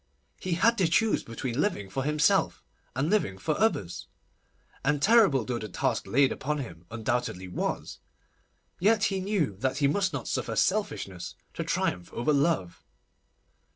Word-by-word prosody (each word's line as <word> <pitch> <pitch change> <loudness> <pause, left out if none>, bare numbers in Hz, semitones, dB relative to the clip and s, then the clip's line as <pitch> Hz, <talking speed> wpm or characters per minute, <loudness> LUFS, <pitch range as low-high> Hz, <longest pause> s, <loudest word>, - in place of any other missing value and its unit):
He 185 - -2
had 230 +7 +3
to 185 - +4
choose 215 +7 +2
between 120 +3 -3
living 100 - -1
for 130 +8 -3
himself 150 +1 +2 0.3
and 135 +4 0
living 195 - +1
for 150 +10 -1
others, 105 - 0 0.8
and 145 +2 +2
terrible 195 - +5
though 120 -2 -2
the 110 - -6
task - - -1
laid 135 +2 +4
upon 150 +2 -2
him 85 - -8
undoubtedly 115 -4 -2
was, 90 - -3 0.8
yet 210 +3 +3
he 195 -3 +1
knew 185 - 0
that 130 +4 -1
he 145 -1 +3
must 190 +6 +1
not - - -4
suffer - - -2
selfishness 190 - -1 0.2
to - - -3
triumph 90 -1 -1
over 120 +6 +1
love. 140 - 0
140 Hz, 155 wpm, -28 LUFS, 115-190 Hz, 0.8 s, terrible